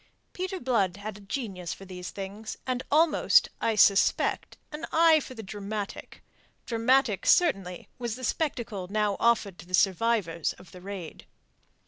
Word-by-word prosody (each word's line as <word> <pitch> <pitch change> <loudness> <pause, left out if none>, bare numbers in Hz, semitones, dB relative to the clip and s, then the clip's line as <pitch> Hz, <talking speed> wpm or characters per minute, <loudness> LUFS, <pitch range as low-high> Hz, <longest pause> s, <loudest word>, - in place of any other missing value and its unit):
Peter 370 +1 -4
Blood 205 - 0
had 205 0 -6
a - - -15
genius 195 -5 -5
for 195 - -12
these 180 -1 -7
things, 200 +3 -7
and 255 -1 -1
almost, 310 +1 +4
I 225 - +1
suspect, 200 -1 +3
an 305 +2 -6
eye 325 -1 +6
for 260 -3 -9
the 225 - -7
dramatic. 205 +1 -6 0.4
Dramatic, 230 -3 +2
certainly, 195 - +2
was 235 -3 -3
the 255 - -10
spectacle 235 - -2
now 210 -1 +1
offered 220 -5 +1
to - - -12
the 185 - +2
survivors 190 -4 +1
of 180 - -17
the 180 - -12
raid. 190 -4 -8
215 Hz, 150 wpm, -28 LUFS, 195-255 Hz, 0.4 s, eye